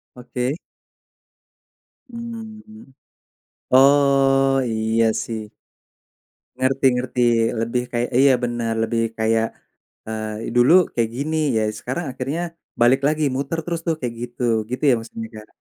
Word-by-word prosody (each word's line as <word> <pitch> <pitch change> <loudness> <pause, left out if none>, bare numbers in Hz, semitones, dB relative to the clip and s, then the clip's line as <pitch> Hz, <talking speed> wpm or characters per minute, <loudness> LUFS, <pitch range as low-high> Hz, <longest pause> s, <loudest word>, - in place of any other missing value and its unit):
Oke. 125 +2 -3 1.5
Mmm. 225 - -9 0.8
Oh, 135 0 +5
iya, 110 0 +1
sih. 110 -2 -4 1.1
Ngerti 135 +1 0
ngerti. 125 0 -2 0.4
Lebih 115 +2 -1
kayak 120 0 -1
iya 135 0 +6
benar. 120 -1 -1
Lebih 115 +1 0 0.2
kayak, 110 0 +2 0.6
eee, 110 +1 -4
dulu 120 +5 +5 0.2
kayak 115 -2 0
gini, 155 +4 -2 0.2
ya, 110 - +2 0.2
sekarang 135 +8 -4
akhirnya 135 +6 -3 0.4
balik 125 +3 +5
lagi, 155 +1 0
muter 140 +4 -2
terus, 170 0 -3
tuh, 165 - +2
kayak 120 -2 -3
gitu, 120 +1 -7 0.3
gitu 125 - -4
ya - - +5
maksudnya, 115 0 -8
Kak? 105 0 -10
125 Hz, 120 wpm, -21 LUFS, 115-140 Hz, 1.5 s, iya